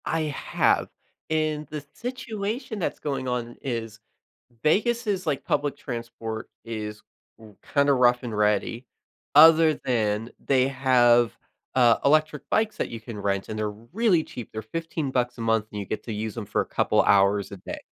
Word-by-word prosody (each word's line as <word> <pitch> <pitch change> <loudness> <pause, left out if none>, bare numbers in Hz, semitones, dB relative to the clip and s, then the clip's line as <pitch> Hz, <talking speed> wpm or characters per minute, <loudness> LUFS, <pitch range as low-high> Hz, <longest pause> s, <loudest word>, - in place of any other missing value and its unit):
I 165 - 0
have, 150 -2 +1 0.4
and 155 -1 0
the 150 0 -7
situation 235 -2 -4
that's 180 - -2
going 135 -3 -3
on 120 -1 -3
is 115 -4 -4 0.6
Vegas 235 +9 +2
is 190 -3 -1
like 145 -4 -1
public 145 -1 0
transport 115 -3 -6 0.2
is 105 -2 -5 0.4
r 110 -2 -15 0.2
kinda 140 -1 +4
rough 125 -1 +3
and 115 -3 -4
ready, 105 +4 +1 0.5
other 160 +1 +8
than 110 -2 -1
they 130 -1 +3
have, 125 -3 +3 0.4
uh, 120 -3 +5
electric 150 0 +2
bikes 220 0 +1
that - - -2
you 115 - -6
can 110 -1 -8
rent, 100 -1 -1
and 110 - -4
they're 105 -1 -1 0.2
really 205 -7 +3
cheap, 120 -7 -9
they're 110 - -5
15 155 +4 -4
bucks 125 -1 -1
a - - -6
month 115 -2 +1
and 105 - -5
you 100 - -4
get 110 - -4
to 115 - -5
use 105 0 -4
them 115 -3 -5
for 100 - 0
a - - -3
couple - - +2
hours 100 0 +3
a 100 - -7
day. - - -7
125 Hz, 175 wpm, -25 LUFS, 110-155 Hz, 0.6 s, other